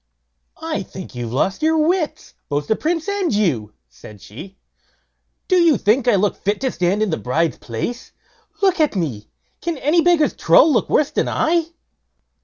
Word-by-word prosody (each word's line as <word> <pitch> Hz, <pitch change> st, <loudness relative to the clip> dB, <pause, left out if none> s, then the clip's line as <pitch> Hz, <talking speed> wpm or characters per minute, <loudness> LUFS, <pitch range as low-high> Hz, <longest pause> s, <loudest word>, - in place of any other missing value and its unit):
"I -, -, -2 dB
think -, -, -10 dB
you've 120 Hz, -2 st, -5 dB
lost 185 Hz, -, -1 dB
your 320 Hz, +1 st, +2 dB
wits, 315 Hz, -1 st, -1 dB, 0.2 s
both 145 Hz, 0 st, -1 dB
the 220 Hz, -, +1 dB
Prince 330 Hz, -, -2 dB
and 400 Hz, -3 st, -1 dB
you", 145 Hz, -, 0 dB
said 65 Hz, -, -14 dB
she. 185 Hz, -, -12 dB, 0.9 s
"Do 370 Hz, -, +3 dB
you 335 Hz, -6 st, +4 dB
think 235 Hz, +4 st, +1 dB
I 240 Hz, -, +5 dB
look 200 Hz, +1 st, +1 dB
fit 205 Hz, +1 st, -2 dB
to 260 Hz, -1 st, 0 dB
stand 185 Hz, +4 st, 0 dB
in 210 Hz, -, -1 dB
the 160 Hz, -, -1 dB
bride's 160 Hz, +7 st, -1 dB
place? 125 Hz, -, -5 dB, 0.5 s
look 380 Hz, -2 st, +3 dB
at 305 Hz, -7 st, +2 dB
me! 140 Hz, -, -3 dB, 0.3 s
Can 340 Hz, -2 st, -3 dB
any 300 Hz, +5 st, +2 dB
beggar's 340 Hz, -3 st, +3 dB
trull 315 Hz, -, +4 dB
look 235 Hz, -, 0 dB
worse 295 Hz, -, +2 dB
than -, -, -1 dB
I?" 330 Hz, 0 st, +1 dB
225 Hz, 175 wpm, -20 LUFS, -, 0.9 s, I